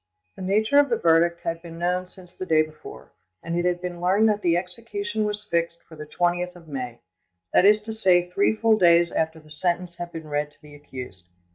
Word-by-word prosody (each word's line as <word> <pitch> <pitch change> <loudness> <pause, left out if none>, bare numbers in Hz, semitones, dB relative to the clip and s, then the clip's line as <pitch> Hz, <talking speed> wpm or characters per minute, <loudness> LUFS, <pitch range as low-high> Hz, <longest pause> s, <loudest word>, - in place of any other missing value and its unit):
The - - -10
nature 215 +8 +3
of 285 -1 +3
the 235 - +1
verdict 170 0 +3
had 165 0 -3
been 165 -1 -10
known 180 +1 -1
since 180 -1 -10
the 185 - -6
day 155 -2 +4
before, 155 0 -12 0.3
and 170 0 -3
it 175 0 0
had 180 0 0
been 175 -1 -5
learned 195 +5 +3
that 210 -1 0
the 170 -2 +2
execution 210 +3 -3
was 210 0 -3
fixed 170 -3 -2
for 160 - -15
the 150 0 -9
20th 175 +2 -1
of 170 -2 -15
May—that 95 - -3
is 210 +1 +5
to 220 +1 -5
say, 185 -5 +3
three 195 +4 +1
full 220 0 +3
days 170 -1 +5
after 160 0 -1
the 155 -1 -19
sentence 175 +2 -2
had 175 0 -6
been 160 -2 -8
read 150 0 -2
to 145 - -30
the 150 -1 -14
accused. 125 -10 -10
175 Hz, 220 wpm, -24 LUFS, 160-195 Hz, 0.3 s, is